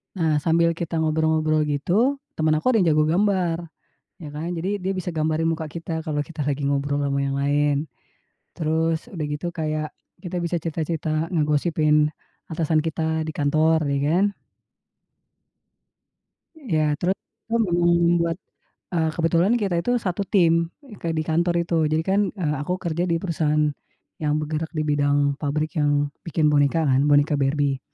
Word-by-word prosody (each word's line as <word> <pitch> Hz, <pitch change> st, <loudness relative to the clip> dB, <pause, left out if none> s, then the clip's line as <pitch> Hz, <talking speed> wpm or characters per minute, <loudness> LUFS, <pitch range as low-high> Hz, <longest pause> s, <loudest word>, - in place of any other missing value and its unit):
Nah, 155 Hz, -4 st, +1 dB
sambil 170 Hz, 0 st, +3 dB
kita 165 Hz, 0 st, -3 dB
ngobrol-ngobrol 155 Hz, 0 st, +2 dB
gitu, 185 Hz, -, +1 dB, 0.2 s
teman 155 Hz, 0 st, +1 dB
aku -, -, -3 dB
ada 255 Hz, -, +4 dB
yang 165 Hz, -, +3 dB
jago 155 Hz, 0 st, +3 dB
gambar, 175 Hz, -1 st, +1 dB, 0.6 s
ya 150 Hz, -, -6 dB
kan. 155 Hz, +4 st, -5 dB
Jadi 190 Hz, +5 st, -2 dB
dia 190 Hz, +1 st, -2 dB
bisa 185 Hz, -1 st, -3 dB
gambarin 160 Hz, 0 st, 0 dB
muka 160 Hz, -1 st, -3 dB
kita 165 Hz, +1 st, -5 dB
kalau 150 Hz, -1 st, -1 dB
kita 150 Hz, -2 st, -5 dB
lagi 145 Hz, 0 st, -1 dB
ngobrol 140 Hz, +1 st, 0 dB
ama 140 Hz, 0 st, 0 dB
yang 135 Hz, -, -2 dB
lain. 145 Hz, +1 st, +2 dB, 0.8 s
Terus, 160 Hz, +3 st, 0 dB
udah 170 Hz, -10 st, -5 dB
gitu 150 Hz, +4 st, -3 dB
kayak 155 Hz, -1 st, -3 dB, 0.2 s
kita 175 Hz, -1 st, -4 dB
bisa 170 Hz, 0 st, -1 dB
cerita-cerita 160 Hz, 0 st, -2 dB
ngegosipin 150 Hz, -1 st, +2 dB, 0.4 s
atasan 160 Hz, -1 st, +1 dB
kita 160 Hz, 0 st, -1 dB
di 155 Hz, -, -4 dB
kantor 155 Hz, +1 st, +2 dB
ya 140 Hz, -, 0 dB
kan. 180 Hz, +5 st, +3 dB, 2.4 s
Ya 155 Hz, -, 0 dB
teru 180 Hz, +2 st, +1 dB, 0.4 s
mmm, 175 Hz, -5 st, +3 dB
buat 170 Hz, 0 st, 0 dB, 0.6 s
eee, 160 Hz, -2 st, +1 dB
kebetulan 170 Hz, +5 st, +2 dB
kita 195 Hz, -4 st, 0 dB
itu 245 Hz, -, -1 dB
satu 200 Hz, -1 st, -2 dB
tim, 170 Hz, -3 st, +3 dB, 0.2 s
eee, 235 Hz, -8 st, -13 dB
ke -, -, -5 dB
di 155 Hz, -, 0 dB
kantor 170 Hz, +2 st, +1 dB
itu, 170 Hz, 0 st, -2 dB, 0.2 s
jadi 155 Hz, +1 st, +1 dB
kan, 195 Hz, +3 st, +1 dB, 0.2 s
eee, 155 Hz, -6 st, -1 dB
aku 180 Hz, +5 st, -1 dB
kerja 170 Hz, 0 st, -1 dB
di 170 Hz, -, +1 dB
perusahaan 150 Hz, -4 st, +1 dB, 0.5 s
yang 150 Hz, -1 st, +1 dB
bergerak 155 Hz, +1 st, -3 dB
di 155 Hz, -, 0 dB
bidang 145 Hz, -1 st, +2 dB, 0.2 s
pabrik 155 Hz, +3 st, -2 dB
yang 145 Hz, 0 st, +1 dB, 0.2 s
bikin 155 Hz, -2 st, +2 dB
boneka 145 Hz, +3 st, +3 dB
kan, 135 Hz, -1 st, +3 dB
boneka 145 Hz, +1 st, +4 dB
Barbie. 140 Hz, 0 st, +1 dB
160 Hz, 155 wpm, -23 LUFS, 150-170 Hz, 2.4 s, ada